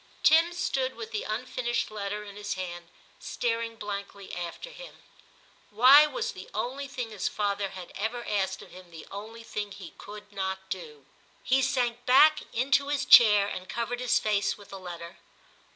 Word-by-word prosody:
Tim 330 +2 +6
stood 270 -7 -1
with 225 -1 -8
the 215 - -2
unfinished 240 +1 -2
letter 210 0 -4
in 200 -1 -11
his 205 0 -4
hand 175 -2 -6 0.3
staring 230 -1 -2
blankly 200 -2 -7
after 175 - -6
him. - - -11 0.7
Why 260 +8 +8
was 480 +8 -3
the - - -11
only 275 +3 -3
thing 250 -4 -5
his 210 -3 -2
father 200 -1 -1
had 185 -2 -9
ever 230 +4 -3
asked 190 -2 -1
of - - -16
him 185 -1 -13
the 165 -2 -11
only 220 +3 -8
thing 205 -2 -5
he 195 -4 -10
could 210 0 -11
not 190 -1 -4
do? 150 -6 -7 0.4
He 265 +1 +3
sank 245 -3 0
back 305 +5 +7
into 270 +3 +2
his 285 -1 -1
chair 210 -4 +8
and 185 -2 -6
covered 235 +1 -3
his 250 -2 +2
face 205 -2 0
with 205 -1 -15
the 195 - -8
letter. 175 -1 -8
215 Hz, 170 wpm, -28 LUFS, 195-250 Hz, 0.7 s, Why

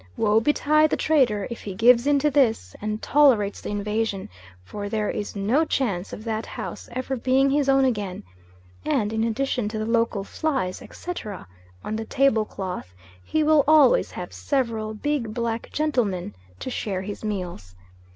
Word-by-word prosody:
Woe 215 0 +3
betide 300 +4 +3
the - - 0
trader 250 -10 +2
if 235 - -6
he 195 -2 -6
gives 235 +4 +5
in 290 -1 +4
to 295 +2 +2
this, 230 - +1
and 215 +1 -3
tolerates 255 -9 +3
the - - -6
invasion, 210 0 -2 0.3
for 205 - -6
there 210 -1 -1
is 205 - -5
no 220 +10 +2
chance 205 - -1
of 215 - -7
that 220 -1 -3
house - - -7
ever 255 +2 -2
being 265 +2 +2
his 280 -1 +2
own 270 0 +5
again; 205 -7 -2 0.6
and 245 -9 0
in 220 0 0
addition 235 -1 -1
to 215 - -5
the 215 - -2
local 230 -3 +1
flies, 260 -6 -2
etc., 215 - -7 0.4
on 215 - -3
the 220 - -4
table 250 -4 +2
cloth, 180 - -6 0.3
he 315 - 0
will 305 -1 +5
always 310 - +5
have - - -7
several 225 -6 -1
big 235 -3 -2
black 235 -1 -2
gentlemen 230 - -1 0.2
to 260 - -5
share 190 -6 -3
his 205 +2 -7
meals. 180 - -5
225 Hz, 170 wpm, -24 LUFS, 205-275 Hz, 0.6 s, gives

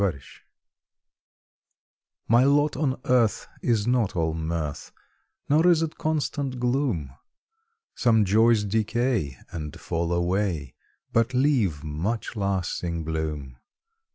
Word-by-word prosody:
MY 100 - +4
LOT 70 -7 -5 2.0
My 120 +3 +5
lot 145 +2 +3
on 135 -2 -1
earth 120 -4 +2
is 110 -4 +1
not 120 -4 +1
all 80 -2 0
mirth, 80 -2 -4 0.6
Nor 155 +4 +4
is 165 -2 +5
it 160 - -5
constant 145 -4 -1
gloom; 120 - 0 0.8
Some 110 -4 +3
joys 110 +2 +4
decay 110 - 0
and 75 -3 -6
fall 85 0 -2
away, 85 -5 -1 0.4
But 115 +3 +2
leave 120 - +2
much 85 +12 -3
lasting 90 -4 -2
bloom. 75 -5 -4
105 Hz, 110 wpm, -25 LUFS, 80-125 Hz, 2.0 s, My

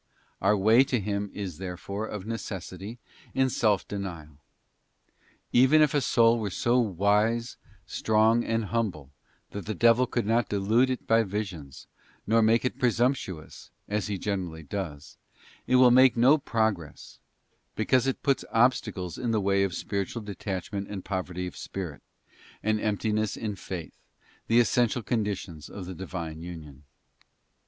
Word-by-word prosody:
Our 105 +2 +3
way 110 +6 +6
to 125 -3 0
Him 100 0 -2
is 95 -6 -6
therefore, 95 +3 -5
of 105 -2 -6
necessity, 100 -1 -6 0.4
in 130 -1 +2
self 105 -5 +1
denial. 85 -7 -6 1.1
Even 130 +5 +6
if 150 - +2
a 145 - +2
soul 115 -2 +4
were 105 -2 -2
so 120 +6 +1
wise, 105 +3 +1 0.3
strong, 110 +2 +2
and 115 -1 -1
humble 90 - -2 0.4
that 100 0 -7
the 110 - -2
devil 120 +5 +4
could 120 -2 -1
not 115 +1 +1
delude 110 +6 +2
it 130 - -3
by 115 0 +4
visions, 95 -10 -5 0.4
nor 115 +2 +3
make 115 +2 +3
it 125 - -2
presumptuous, 120 - -1 0.2
as 105 -1 -1
he 100 -2 -2
generally 90 -5 -3
does, 75 -3 -6 0.5
it 130 - +3
will 125 -1 +7
make 130 0 +6
no 135 +6 +5
pro 110 -4 +1
gress, 85 -8 -11 0.6
because 125 +4 +2
it 135 - -2
puts 140 -1 +1
obstacles 110 -7 +1
in 125 - -2
the 110 -1 +2
way 100 0 +2
of 95 -3 0
spiritual 100 +3 -3
detachment 100 -1 -5
and 95 -3 -6
poverty 90 -2 -3
of 90 - -7
spirit, 85 -7 -6 0.6
and 110 0 +1
emptiness 110 0 0
in 105 -3 -3
faith, 90 -3 -7 0.5
the 115 +1 +4
essential 120 0 +2
conditions 100 -9 -3
of 95 - -7
the 95 - -6
Divine 85 -3 -6
union. 75 -5 -10
105 Hz, 150 wpm, -27 LUFS, 95-115 Hz, 1.1 s, will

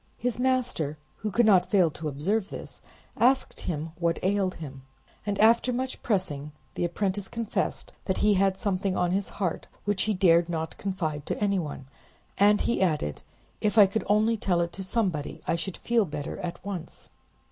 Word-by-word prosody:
His 245 0 -2
master, 250 - 0 0.2
who 215 - -3
could 235 +4 +3
not 195 -4 +5
fail 185 -6 +4
to 155 +1 -5
observe 190 +9 -1
this, - - -8 0.3
asked 260 +3 +2
him 160 -1 -3
what 170 -1 +1
ailed 190 -1 +1
him, 135 -4 -8 0.5
and 200 -1 0
after 230 +3 +5
much 255 +1 -3
pressing 150 -9 -1 0.2
the - - -2
apprentice 195 +2 -1
confessed 230 -2 -2
that 190 - 0
he 210 0 +4
had 195 0 +2
something 195 -2 -1
on 175 -1 +1
his 195 +1 0
heart 185 -5 -2 0.2
which 205 -2 +1
he 215 - +2
dared 175 -2 +4
not 160 -1 -3
confide 160 -7 -3
to - - -1
anyone, 185 -10 -1 0.5
and 205 +1 +5
he 235 - 0
added, 150 - 0 0.4
"If 210 0 +1
I 210 - +10
could 200 +3 -1
only 215 +3 +3
tell 180 -4 +1
it 170 0 -2
to 190 - -5
somebody, 185 -8 -1
I - - +2
should 170 +2 -4
feel 235 -3 +2
better 150 0 -5
at 175 -1 -6
once." 180 -5 -6
190 Hz, 180 wpm, -27 LUFS, 170-210 Hz, 0.5 s, I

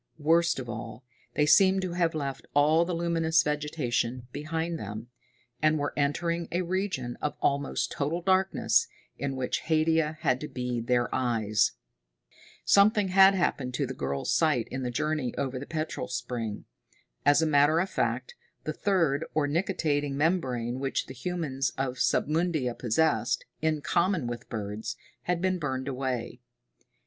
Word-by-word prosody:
Worst 165 +2 +3
of 130 -2 -5
all, 115 +1 -7 0.3
they 150 - +3
seemed 190 +4 +5
to 185 - -2
have 170 -2 +1
left 140 -3 -4
all 155 +3 +4
the 175 0 -2
luminous 165 -1 +2
vegetation 130 -5 -1
behind 160 +3 -3
them, 105 +3 -7 0.5
and 155 0 +3
were 145 -1 -2
entering 170 +4 0
a 180 +2 0
region 180 -9 -2
of 150 - -2
almost 140 0 0
total 150 +4 -1
darkness, 185 -11 +3 0.3
in 140 -1 -2
which 130 -1 -1
Haidia 160 -1 +1
had 130 -3 +1
to 150 - -4
be 125 -3 -3
their 120 0 +1
eyes. 110 -4 +1 0.9
Something 200 0 +5
had 195 +1 +7
happened 130 -8 -1
to - - 0
the - - -5
girl's 70 0 -2
sight - - +2
in 130 - -3
the 125 - -2
journey 150 0 -1
over 130 -2 -2
the 140 - -8
petrol 155 -5 -3
spring. 120 -4 -4 0.6
As 145 +2 +5
a - - +3
matter 150 +1 +4
of 185 - +1
fact, 485 - -2 0.3
the - - -3
third, 165 -7 +1
or 155 -2 +2
nictitating 145 -4 0
membrane, 130 -7 0
which 135 0 -1
the - - -9
humans 135 -2 -2
of 130 -1 -2
Submundia 155 -5 +1
possessed, 120 0 +1 0.2
in 155 -1 +1
common 170 +1 +1
with 120 0 -6
birds, 105 -1 -4 0.3
had 180 0 -1
been 185 -1 +1
burned 130 -3 -3
away. 130 -3 -3
145 Hz, 155 wpm, -28 LUFS, 125-170 Hz, 0.9 s, had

